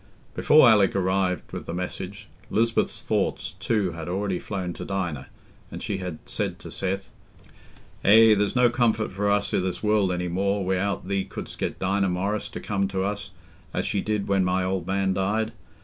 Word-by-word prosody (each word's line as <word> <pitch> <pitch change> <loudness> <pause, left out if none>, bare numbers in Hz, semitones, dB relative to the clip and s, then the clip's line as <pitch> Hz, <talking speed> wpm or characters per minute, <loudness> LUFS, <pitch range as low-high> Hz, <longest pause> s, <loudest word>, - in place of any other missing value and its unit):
Before 150 -3 +6
Alick 105 -4 +5
arrived 95 -1 0
with - - -6
the 85 - -3
message, 90 +2 -5 0.2
Lisbeth's 115 +2 +1
thoughts - - -1
too 105 -5 +1
had 85 0 -6
already 95 0 -1
flown 95 -4 -4
to - - -7
Dinah, 85 -8 -3 0.4
and - - -7
she 100 - -2
had 90 -4 -5
said - - -3
to - - -10
Seth, 95 +1 -3 0.9
"Eh, 110 +2 +8
there's 105 +2 +1
no 125 -1 +5
comfort 115 -3 +1
for 100 +2 0
us 100 0 +1
i' - - +3
this 95 +1 -3
world 105 -3 +3
any 90 0 -1
more, 100 +2 0
wi'out 95 +1 -1
thee 100 0 0
couldst 95 - -8
get - - -2
Dinah 95 0 +1
Morris 100 +4 -1
to - - -6
come 100 -1 -1
to 95 -1 -2
us, 100 0 -3 0.5
as - - 0
she 100 - 0
did 105 -2 -1
when 100 -1 +3
my 90 0 +1
old 90 -2 -2
man 95 0 +1
died. 105 +4 0
95 Hz, 185 wpm, -25 LUFS, 95-105 Hz, 0.9 s, Eh